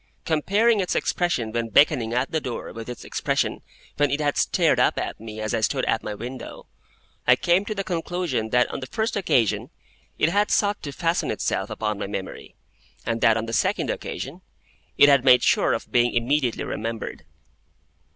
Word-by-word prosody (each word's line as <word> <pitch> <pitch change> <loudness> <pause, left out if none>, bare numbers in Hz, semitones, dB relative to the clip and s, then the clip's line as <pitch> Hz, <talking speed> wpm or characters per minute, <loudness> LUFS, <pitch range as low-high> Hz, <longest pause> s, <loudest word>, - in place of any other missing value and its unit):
Comparing 205 +8 +2
its 185 - -1
expression 130 -11 0
when 115 0 -2
beckoning 115 -1 +4
at 125 +3 -1
the 160 - 0
door 125 -4 -5
with 115 +1 -8
its 125 - -8
expression - - -1 0.4
when 145 0 +3
it 140 +2 -1
had 145 -1 0
stared - - +2
up - - +3
at - - -4
me 110 0 -8
as 110 0 -3
I - - 0
stood - - 0
at - - +1
my 105 - -5
window, 125 +4 -8 0.6
I - - +7
came 175 +3 +2
to 215 - -4
the 195 - -2
conclusion 175 - -2
that 125 +2 +3
on - - -4
the 130 - -7
first 220 - -2
occasion 130 - +1 0.5
it 155 - +3
had 205 +4 +1
sought 205 0 +1
to 145 - -6
fasten 165 +3 -1
itself - - -2
upon 105 -2 -3
my 105 - -3
memory, 95 -1 -7 0.5
and 115 0 -2
that 115 0 +5
on 115 - -2
the 115 - -6
second - - +1
occasion - - -6 0.6
it 145 - +8
had 140 -3 +5
made 125 -2 +6
sure - - +3
of - - -5
being 120 0 +2
immediately 125 +1 +1
remembered. 115 0 -5
130 Hz, 190 wpm, -24 LUFS, 115-170 Hz, 0.6 s, it